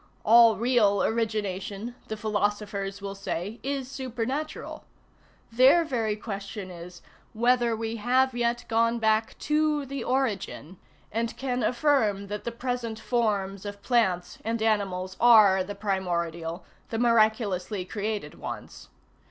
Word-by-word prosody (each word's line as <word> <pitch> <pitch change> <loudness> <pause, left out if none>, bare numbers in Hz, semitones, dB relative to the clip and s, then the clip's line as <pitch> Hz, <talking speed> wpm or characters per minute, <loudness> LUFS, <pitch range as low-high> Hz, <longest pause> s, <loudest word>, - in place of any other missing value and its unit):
All 230 0 +7
real 220 -3 +3
origination, 215 -1 -2
the 220 - -4
philosophers 205 -2 -2
will 200 0 -4
say, 195 +2 -4
is 275 -1 -3
supernatural; 260 +3 -4 0.7
their 260 +8 +6
very 230 -7 -1
question 200 -2 -6
is, 175 0 -11 0.3
whether 240 0 +2
we 225 +1 -4
have 255 +4 +2
yet 240 0 0
gone 230 +1 +2
back 220 0 +1
to 300 -1 +1
the 275 +1 -5
origin, 210 - -2 0.3
and 230 +2 -2
can 250 -2 -2
affirm 230 -8 +1
that 210 0 -5
the 235 - -2
present 235 -2 -3
forms 205 -5 -1
of 205 -1 -8
plants 190 -8 +1
and 225 +1 -1
animals 190 -4 0
are 215 -6 +7
the 205 +2 -7
primordial, 175 -4 -2 0.2
the 225 - -3
miraculously 215 -5 +2
created 205 -5 -4
ones. - - -8
220 Hz, 125 wpm, -27 LUFS, 200-240 Hz, 0.7 s, All